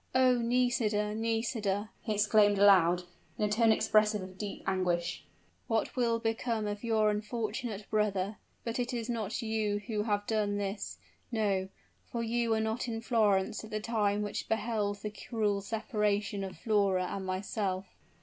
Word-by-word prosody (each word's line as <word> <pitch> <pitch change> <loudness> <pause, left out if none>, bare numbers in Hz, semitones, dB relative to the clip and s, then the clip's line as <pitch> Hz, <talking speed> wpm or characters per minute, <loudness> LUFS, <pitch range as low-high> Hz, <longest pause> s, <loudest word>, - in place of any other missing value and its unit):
"Oh! 255 -1 +5
Nisida, 230 -3 +1
Nisida!" 225 -2 -1
he 215 -3 -2
exclaimed 205 0 +4
aloud, 180 -3 +6 0.3
in 210 - +1
a - - 0
tone 225 +2 +4
expressive 215 -2 +3
of 185 0 -9
deep 205 +1 -6
anguish; 180 -2 0 0.4
"what 225 -2 0
will 235 -2 +2
become 225 -1 -1
of 205 +1 -4
your 220 -2 +3
unfortunate 215 0 -3
brother? 210 -1 0 0.3
But 230 +1 -3
it 245 0 -1
is 235 0 -2
not 225 0 -2
you 220 -2 0
who 215 -3 -1
have 205 -1 0
done 210 -2 0
this! 195 - -3 0.3
No 200 -4 0 0.3
for 235 -1 -4
you 235 +1 0
were 220 -1 +2
not 220 +3 -1
in 225 -1 -2
Florence 210 -4 +2
at 220 - -9
the 215 - -2
time 210 -2 0
which 205 - -4
beheld 210 -2 -1
the 210 - -3
cruel 210 -1 -1
separation 210 -2 -1
of 190 -1 -6
Flora 200 -5 +2
and 195 +1 -4
myself!" 190 0 -2
210 Hz, 160 wpm, -31 LUFS, 200-225 Hz, 0.4 s, aloud